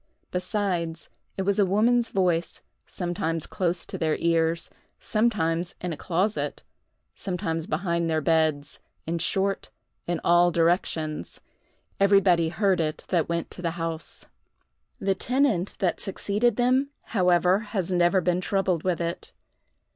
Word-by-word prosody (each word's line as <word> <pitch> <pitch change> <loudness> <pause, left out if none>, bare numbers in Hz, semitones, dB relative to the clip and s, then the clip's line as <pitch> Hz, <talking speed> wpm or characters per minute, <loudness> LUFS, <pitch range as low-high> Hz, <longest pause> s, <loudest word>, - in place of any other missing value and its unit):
Besides, 180 -3 -2 0.3
it 190 - 0
was 200 +1 +1
a - - +6
woman's 230 +5 +3
voice, 175 -3 0 0.3
sometimes 165 -3 -2
close 175 -2 -1
to - - -6
their 160 -2 +1
ears, 165 0 +1 0.3
sometimes 180 -7 0
in 180 -2 -3
a - - -4
closet, 190 +7 -1 0.5
sometimes 165 -4 -3
behind 170 0 -1
their 160 -1 +1
beds—in 160 +1 -1
short, 195 +3 0 0.4
in 175 -1 -1
all 175 +1 +5
directions. 165 - 0 0.6
Everybody 195 -4 +4
heard 190 +1 +1
it 155 -1 -3
that 170 -3 +1
went 170 0 -2
to - - -8
the 170 -1 -2
house. 165 -1 -4 0.7
The 195 0 +1
tenant 230 -3 +1
that 180 -3 0
succeeded 205 +3 0
them, 255 +3 +2 0.2
however, 180 -1 +4
has 205 -5 -3
never 175 +1 +3
been 180 +1 +1
troubled 190 -3 0
with 180 -1 0
it. 170 0 -4
175 Hz, 130 wpm, -26 LUFS, 165-195 Hz, 0.7 s, a